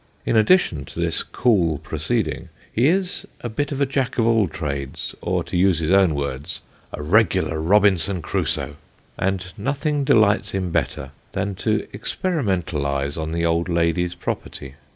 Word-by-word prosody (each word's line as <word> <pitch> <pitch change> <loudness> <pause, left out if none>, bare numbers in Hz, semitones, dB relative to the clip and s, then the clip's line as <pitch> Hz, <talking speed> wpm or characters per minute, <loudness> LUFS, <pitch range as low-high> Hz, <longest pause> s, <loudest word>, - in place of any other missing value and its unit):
In - - +1
addition 110 - +4
to 80 +3 -9
this 85 -1 0
cool 90 - +1
proceeding, 80 +9 -2 0.2
he 120 +5 +3
is 185 +3 0
a 120 - -4
bit 145 +7 -2
of 140 - -3
a 140 - +3
Jack 135 -1 -1
of 115 - +3
all 115 -3 +3
trades, 70 -4 -4
or - - 0
to - - -6
use 90 -1 +4
his 80 +1 -1
own 95 -5 +5
words 70 +3 -4 0.2
" - - -33
a 75 - -6
regular 95 -2 +2
Robinson 95 0 +3
Crusoe; 75 -2 -2 0.2
" - - -36
and 95 -1 -1
nothing 145 +4 -1
delights 110 -3 +3
him 95 -2 -2
better 65 -3 -2 0.2
than 100 +1 -1
to 105 +3 -1
experimentalise 85 - -1
on 80 -1 -3
the 85 0 0
old 85 +1 +1
lady's 85 +1 +1
property. 70 -5 -5
95 Hz, 165 wpm, -22 LUFS, 80-110 Hz, 0.2 s, own